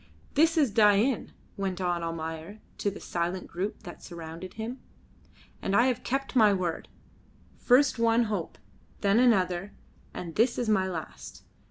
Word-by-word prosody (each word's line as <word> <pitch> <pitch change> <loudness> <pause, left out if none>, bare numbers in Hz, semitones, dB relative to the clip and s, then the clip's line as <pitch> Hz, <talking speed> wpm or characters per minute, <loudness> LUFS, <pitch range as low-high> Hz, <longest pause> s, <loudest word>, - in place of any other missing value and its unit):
"This 320 +3 +3
is 285 -8 +3
Dain," 210 +3 +3 0.3
went 190 -2 -2
on 175 -2 0
Almayer 165 +4 -5 0.2
to 205 - +1
the 200 - -8
silent 175 +2 -3
group 195 +5 -5
that 175 -4 -10
surrounded 170 +1 -8
him. 225 +4 -5 0.8
"And 195 - 0
I 235 - +5
have 255 -3 0
kept 270 +1 -2
my 215 -4 +6
word. 175 -3 -3 0.7
First 255 0 +4
one 230 +1 +4
hope, 205 -7 -3 0.4
then 200 +2 +3
another, 195 -5 +2 0.4
and 170 -2 -7
this 235 +6 +2
is 240 - -1
my 195 -3 +2
last. 170 -4 -7
200 Hz, 150 wpm, -28 LUFS, 175-230 Hz, 0.8 s, my